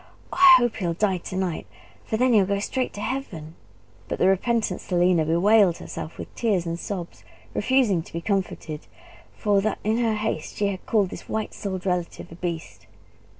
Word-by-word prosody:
I 360 -1 +9
hope 240 -2 0
he'll 175 -4 -1
die 190 -1 +1
to 185 - -7
night, 185 -3 -2 0.4
for 220 - -1
then 250 +1 +3
he'll 200 -4 +5
go 200 0 +1
straight 255 +5 -2
to 205 - -7
heaven!" 200 - -4 0.5
But - - -3
the - - +3
repentant 210 0 +1
Selina 175 -2 +2
bewailed 180 +3 +4
herself 160 - -7
with - - -8
tears 205 -7 0
and 170 0 -3
sobs, 180 -4 -6 0.3
refusing 250 -10 +2
to - - -14
be 170 - -2
comforted; 180 -5 -3 0.5
for 205 -2 +2
that 215 0 -1
in 220 +2 +1
her 225 -2 +1
haste 215 -7 -3
she 205 -1 +1
had 190 -2 -6
called 205 -5 +2
this - - -9
white 220 -1 -2
souled 190 -2 -5
relative 180 -2 -2
a - - -9
beast. 160 - -6
195 Hz, 185 wpm, -24 LUFS, 175-220 Hz, 0.5 s, I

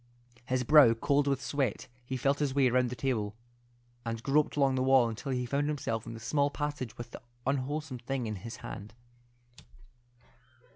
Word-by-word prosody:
His 130 -1 +1
brow 130 -3 +7
cold 140 +5 +2
with 140 -1 0
sweat, 135 -3 -1 0.2
he 130 +2 -4
felt 140 +3 +1
his 140 -3 0
way 135 -2 +5
round 125 0 +3
the 125 - -5
table, 110 -4 -1 0.7
and 115 0 -4
groped 150 +2 +2
along 135 -2 +4
the 130 - 0
wall 130 -2 +5
until 115 +5 -4
he 125 -1 -1
found 140 +3 0
himself 115 -7 -2
in 115 - -6
the - - -8
small 140 +5 +1
passage 145 -6 -4
with 120 0 -8
the - - -9 0.2
unwholesome 140 0 -2
thing 130 +1 -3
in 110 -2 -3
his 115 +5 -7
hand. 105 +3 -8
130 Hz, 180 wpm, -30 LUFS, 115-140 Hz, 0.7 s, brow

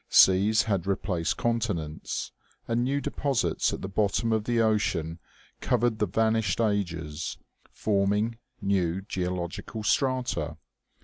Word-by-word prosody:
Seas 100 +3 +6
had 100 -5 -1
replaced 90 -3 0
continents, 105 -10 -2 0.4
and 115 +1 +1
new 140 +3 0
deposits 140 -4 0
at - - -5
the - - -2
bottom 105 +3 +1
of 110 -1 0
the 120 -1 +1
ocean 90 -7 +1 0.4
covered 120 -2 +1
the 105 - +2
vanished 110 0 +1
ages, 85 -8 -1 0.3
forming 105 +2 0 0.2
new 95 -3 0
geological 90 +2 -4
strata. 120 - 0
100 Hz, 115 wpm, -27 LUFS, 90-115 Hz, 0.4 s, Seas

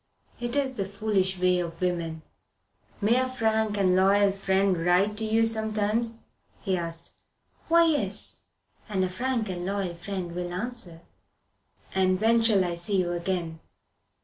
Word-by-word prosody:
It 240 +2 -3
is 275 -2 0
the 200 -6 -3
foolish 195 -2 -1
way 180 0 +2
of 165 -1 -5
women. 170 -3 -2 0.8
"May 220 +4 +3
a 255 0 0
frank 220 -4 0
and 185 -2 +3
loyal 195 +2 +4
friend 195 0 +1
write 185 +4 +2
to 220 - -1
you 225 +1 +2
sometimes?" 220 +1 +1 0.4
he 190 -3 -1
asked. 170 -1 -4 0.5
"Why, 335 0 +5
yes. 265 - +2 0.5
And 190 -3 0
a 185 - 0
frank 240 +3 -2
and 175 -1 -4
loyal 195 -1 -2
friend 180 0 -5
will 175 0 -4
answer." 190 -6 -5 0.9
"And 185 -1 +2
when 230 +2 +3
shall 210 -5 +3
I 175 - -2
see 180 +3 +1
you 175 -1 0
again?" 170 -2 -3
195 Hz, 150 wpm, -26 LUFS, 180-220 Hz, 0.9 s, Why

